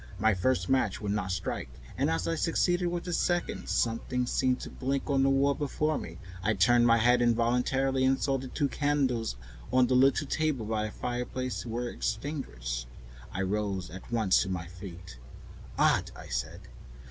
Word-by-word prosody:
My 110 Hz, +1 st, +3 dB
first 90 Hz, -1 st, +1 dB
match 130 Hz, -7 st, +1 dB
would 105 Hz, -1 st, -2 dB
not 95 Hz, -3 st, -1 dB
strike, 90 Hz, -, -3 dB, 0.3 s
and -, -, +1 dB
as 80 Hz, +2 st, -1 dB
I -, -, +1 dB
succeeded 175 Hz, +2 st, +1 dB
with 175 Hz, 0 st, -2 dB
the 175 Hz, -, -4 dB
second, 175 Hz, +1 st, -1 dB
something 125 Hz, +2 st, 0 dB
seemed 125 Hz, +1 st, +1 dB
to -, -, -7 dB
blink 135 Hz, +1 st, -2 dB
on 135 Hz, -1 st, +3 dB
the 135 Hz, -, +4 dB
wall 135 Hz, +1 st, +3 dB
before 150 Hz, +2 st, -1 dB
me. -, -, -8 dB, 0.2 s
I 105 Hz, +3 st, +1 dB
turned 120 Hz, +5 st, +5 dB
my 115 Hz, 0 st, +6 dB
head 120 Hz, +2 st, +4 dB
involuntarily 125 Hz, +3 st, +2 dB
and 130 Hz, 0 st, +3 dB
saw 135 Hz, -1 st, +1 dB
that 130 Hz, -, -6 dB
the -, -, -13 dB
two 145 Hz, -, +2 dB
candles 135 Hz, -, 0 dB, 0.4 s
on 130 Hz, -1 st, +5 dB
the 130 Hz, -, 0 dB
little 135 Hz, +4 st, +4 dB
table 145 Hz, -5 st, -1 dB
by 110 Hz, 0 st, -1 dB
the -, -, -7 dB
fireplace 125 Hz, -3 st, -3 dB
were 120 Hz, +2 st, -2 dB
extinguished. 60 Hz, -, -4 dB, 0.4 s
I 95 Hz, -, -2 dB
rose 95 Hz, -3 st, -2 dB
at 95 Hz, +6 st, -10 dB
once 110 Hz, -5 st, +3 dB
to 95 Hz, -, -2 dB
my 90 Hz, -3 st, -3 dB
feet. 90 Hz, -6 st, -10 dB, 0.6 s
"Odd," -, -, +3 dB
I -, -, -11 dB
said. -, -, -3 dB
120 Hz, 180 wpm, -29 LUFS, 100-135 Hz, 0.6 s, my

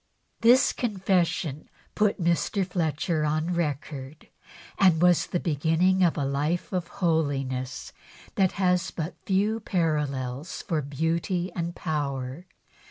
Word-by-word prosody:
This 245 Hz, +4 st, +5 dB
confession 185 Hz, -, -1 dB, 0.2 s
put 210 Hz, -1 st, +1 dB
Mr. 175 Hz, +3 st, +1 dB
Fletcher 165 Hz, -2 st, -1 dB
on 155 Hz, +3 st, 0 dB
record, 145 Hz, -2 st, -4 dB, 0.5 s
and 185 Hz, -5 st, +5 dB
was 175 Hz, 0 st, +4 dB
the 175 Hz, -, -1 dB
beginning 165 Hz, +4 st, +2 dB
of 170 Hz, -2 st, +2 dB
a 145 Hz, -, 0 dB
life 150 Hz, +7 st, -1 dB
of 180 Hz, -2 st, -1 dB, 0.2 s
holiness 135 Hz, -6 st, -1 dB, 0.4 s
that 190 Hz, -2 st, +2 dB
has 180 Hz, -2 st, +1 dB
but 165 Hz, +1 st, -4 dB
few 205 Hz, +3 st, +2 dB
parallels 150 Hz, -, -2 dB
for 160 Hz, -3 st, -1 dB
beauty 165 Hz, +6 st, -1 dB
and 170 Hz, 0 st, -3 dB
power. 145 Hz, 0 st, -3 dB
165 Hz, 115 wpm, -26 LUFS, 145-180 Hz, 0.5 s, This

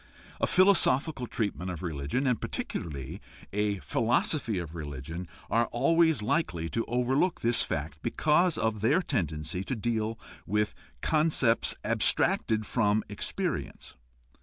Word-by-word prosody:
A -, -, +2 dB
philosophical 160 Hz, -8 st, +4 dB
treatment 100 Hz, -6 st, -2 dB
of 90 Hz, -1 st, -5 dB
religion, 80 Hz, -, -2 dB
and 125 Hz, -4 st, +1 dB
particularly 75 Hz, +3 st, -4 dB, 0.3 s
a 105 Hz, 0 st, +1 dB
philosophy 115 Hz, -, 0 dB
of 85 Hz, -3 st, -5 dB
religion, 80 Hz, +2 st, -6 dB, 0.2 s
are 115 Hz, +1 st, +2 dB
always 160 Hz, -1 st, +3 dB
likely 85 Hz, -, 0 dB
to 115 Hz, -, -1 dB
overlook 130 Hz, +8 st, +1 dB
this 115 Hz, 0 st, +2 dB
fact 75 Hz, -2 st, -3 dB
because 160 Hz, +3 st, +2 dB
of 110 Hz, -2 st, -1 dB
their 145 Hz, -, +3 dB
tendency 85 Hz, -, -2 dB
to 130 Hz, -, -3 dB
deal 110 Hz, 0 st, -1 dB, 0.3 s
with 105 Hz, +2 st, +1 dB, 0.3 s
concepts 150 Hz, -7 st, +2 dB
abstracted 110 Hz, -1 st, +1 dB
from 105 Hz, -2 st, +1 dB
experience. 105 Hz, -, -4 dB
110 Hz, 120 wpm, -29 LUFS, 90-130 Hz, 0.3 s, philosophical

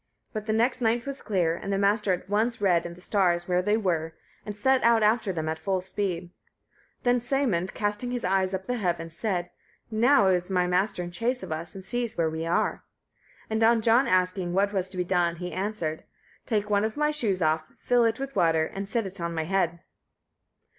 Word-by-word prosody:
But 215 Hz, -1 st, -5 dB
the -, -, +1 dB
next 240 Hz, +3 st, +1 dB
night 235 Hz, +2 st, +1 dB
was 275 Hz, -1 st, -5 dB
clear, 175 Hz, -5 st, 0 dB
and 195 Hz, -, -5 dB
the 195 Hz, -, +1 dB
Master 200 Hz, +1 st, +2 dB
at 180 Hz, 0 st, -2 dB
once 220 Hz, +4 st, 0 dB
read 180 Hz, -4 st, +2 dB
in 170 Hz, -, -9 dB
the 180 Hz, -, -15 dB
stars 175 Hz, -3 st, +1 dB
where 180 Hz, 0 st, +2 dB
they 210 Hz, +3 st, +2 dB
were, 165 Hz, -6 st, -1 dB, 0.3 s
and 210 Hz, 0 st, -5 dB
set 265 Hz, +4 st, +3 dB
out 230 Hz, -1 st, +4 dB
after 215 Hz, -1 st, +2 dB
them 160 Hz, -3 st, -3 dB
at 160 Hz, 0 st, -2 dB
full 190 Hz, -2 st, 0 dB
speed. 185 Hz, -2 st, -3 dB, 0.7 s
Then 245 Hz, 0 st, +3 dB
Sæmund, 235 Hz, -8 st, -1 dB
casting 210 Hz, +4 st, -1 dB
his 245 Hz, -1 st, -3 dB
eyes 190 Hz, 0 st, +1 dB
up 190 Hz, -1 st, -2 dB
at -, -, -26 dB
the 250 Hz, 0 st, -2 dB
heavens, 170 Hz, -5 st, -2 dB
said, 180 Hz, -5 st, -2 dB, 0.4 s
"Now 230 Hz, +1 st, +4 dB
is 180 Hz, -1 st, +2 dB
my 180 Hz, -2 st, +2 dB
Master 180 Hz, +1 st, 0 dB
in 175 Hz, -, -6 dB
chase 240 Hz, +7 st, -1 dB
of -, -, -7 dB
us, 160 Hz, +3 st, -5 dB
and 190 Hz, -, -8 dB
sees 240 Hz, +4 st, -3 dB
where 165 Hz, -2 st, +1 dB
we 160 Hz, +1 st, -3 dB
are." 170 Hz, -, 0 dB, 0.6 s
And 220 Hz, 0 st, 0 dB
on 230 Hz, +1 st, +5 dB
John 235 Hz, +4 st, +4 dB
asking 185 Hz, -2 st, +1 dB
what 200 Hz, +2 st, +2 dB
was 190 Hz, -1 st, -1 dB
to 185 Hz, -, -7 dB
be 180 Hz, -, +1 dB
done, 175 Hz, -2 st, +1 dB
he 180 Hz, +1 st, -6 dB
answered: 185 Hz, -6 st, -3 dB, 0.4 s
"Take 210 Hz, -3 st, 0 dB
one 205 Hz, -1 st, +2 dB
of 220 Hz, +5 st, -2 dB
my 300 Hz, 0 st, +2 dB
shoes 220 Hz, -11 st, 0 dB
off, 155 Hz, 0 st, 0 dB
fill 245 Hz, -1 st, +2 dB
it 225 Hz, +1 st, +1 dB
with 275 Hz, 0 st, -5 dB
water, 165 Hz, -4 st, +3 dB
and 195 Hz, +4 st, -6 dB
set 230 Hz, -1 st, 0 dB
it 190 Hz, -1 st, -7 dB
on 170 Hz, 0 st, -3 dB
my 160 Hz, -, -1 dB
head." 170 Hz, -1 st, 0 dB
195 Hz, 220 wpm, -27 LUFS, 175-225 Hz, 0.7 s, on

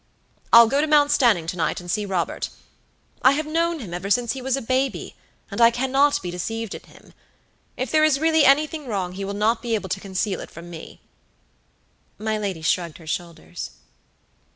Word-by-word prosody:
I'll 235 Hz, 0 st, +10 dB
go 275 Hz, +5 st, +1 dB
to 310 Hz, -, 0 dB
Mount 295 Hz, -1 st, +4 dB
Stanning 225 Hz, -, +3 dB
to 175 Hz, +3 st, -4 dB
night, 170 Hz, -, -1 dB
and 175 Hz, 0 st, -6 dB
see 210 Hz, +1 st, -1 dB
Robert. 185 Hz, -3 st, -2 dB, 0.7 s
I 260 Hz, -, +6 dB
have 305 Hz, +2 st, -1 dB
known 335 Hz, +2 st, 0 dB
him 210 Hz, -, -8 dB
ever 180 Hz, +3 st, -4 dB
since 235 Hz, +2 st, +2 dB
he 265 Hz, -, -5 dB
was 265 Hz, +1 st, 0 dB
a -, -, -4 dB
baby, 260 Hz, +3 st, -1 dB, 0.4 s
and -, -, -2 dB
I 230 Hz, -, +8 dB
cannot 265 Hz, +3 st, +1 dB
be 175 Hz, -, -4 dB
deceived 225 Hz, +5 st, -4 dB
in -, -, -8 dB
him. -, -, -19 dB, 0.6 s
If 255 Hz, -1 st, -3 dB
there 310 Hz, 0 st, +4 dB
is 305 Hz, -3 st, +3 dB
really 320 Hz, 0 st, +3 dB
anything 300 Hz, +1 st, +3 dB
wrong, 195 Hz, -5 st, -2 dB
he 195 Hz, +2 st, -6 dB
will 200 Hz, +1 st, -4 dB
not 225 Hz, +3 st, +1 dB
be 230 Hz, -1 st, -1 dB
able 200 Hz, -3 st, -4 dB
to 195 Hz, -, -2 dB
conceal 195 Hz, 0 st, -2 dB
it -, -, -8 dB
from 170 Hz, +1 st, -11 dB
me." 160 Hz, -2 st, -10 dB, 1.2 s
My 215 Hz, 0 st, -2 dB
lady 190 Hz, -6 st, -4 dB
shrugged 170 Hz, 0 st, 0 dB
her 165 Hz, -, -15 dB
shoulders. 155 Hz, -, -6 dB
225 Hz, 200 wpm, -23 LUFS, 185-275 Hz, 1.2 s, I'll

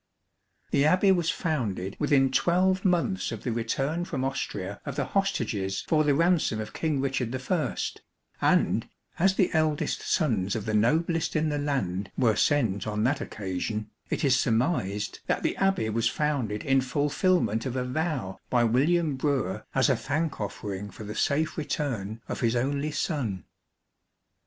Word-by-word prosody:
The 140 Hz, -, +3 dB
Abbey 185 Hz, +5 st, +4 dB
was 175 Hz, -3 st, +2 dB
founded 110 Hz, -, -2 dB
within 140 Hz, -3 st, +3 dB
twelve 185 Hz, +5 st, +2 dB
months 185 Hz, +1 st, +1 dB
of -, -, -6 dB
the 125 Hz, -, -1 dB
return 135 Hz, +8 st, -1 dB
from 145 Hz, -7 st, -3 dB
Austria 105 Hz, -7 st, -4 dB
of 140 Hz, -3 st, -5 dB
the 140 Hz, -2 st, 0 dB
hostages 115 Hz, -, -1 dB
for 155 Hz, -1 st, +3 dB
the 145 Hz, -2 st, +3 dB
ransom 165 Hz, -8 st, +2 dB
of 110 Hz, 0 st, -6 dB
King 155 Hz, -4 st, -1 dB
Richard 130 Hz, -3 st, -1 dB, 0.2 s
I, 170 Hz, -5 st, 0 dB, 0.6 s
and, -, -, +2 dB, 0.3 s
as 190 Hz, +2 st, +4 dB
the 185 Hz, -, +2 dB
eldest 155 Hz, -1 st, +1 dB
sons 110 Hz, -, 0 dB
of 110 Hz, -2 st, -3 dB
the 110 Hz, -, -2 dB
noblest 160 Hz, +9 st, +1 dB
in 155 Hz, 0 st, +2 dB
the 145 Hz, -1 st, -1 dB
land 100 Hz, -10 st, -1 dB
were 115 Hz, -5 st, +3 dB
sent 110 Hz, -, +1 dB
on 105 Hz, 0 st, -1 dB
that 135 Hz, +4 st, +1 dB
occasion, 105 Hz, +2 st, -4 dB, 0.2 s
it -, -, -2 dB
is 130 Hz, -2 st, +5 dB
surmised 110 Hz, -, 0 dB
that -, -, 0 dB
the -, -, 0 dB
Abbey 195 Hz, -, +2 dB
was 115 Hz, +2 st, +1 dB
founded 130 Hz, -9 st, -1 dB
in 135 Hz, -1 st, +4 dB
fulfilment 140 Hz, -, +1 dB
of 130 Hz, -, -4 dB
a 125 Hz, -1 st, -1 dB
vow 130 Hz, -, -2 dB
by 120 Hz, -1 st, +3 dB
William 145 Hz, +6 st, +2 dB
Brewer 130 Hz, -8 st, -1 dB
as 135 Hz, -, +4 dB
a 135 Hz, -, +3 dB
thank 145 Hz, +2 st, -2 dB
offering 100 Hz, -1 st, -4 dB
for 110 Hz, -, -10 dB
the 105 Hz, 0 st, -6 dB
safe 155 Hz, +7 st, 0 dB
return 115 Hz, -8 st, -3 dB
of -, -, -4 dB
his 115 Hz, -1 st, +1 dB
only 140 Hz, +4 st, 0 dB
son. 135 Hz, -, -2 dB
135 Hz, 160 wpm, -27 LUFS, 110-155 Hz, 0.6 s, is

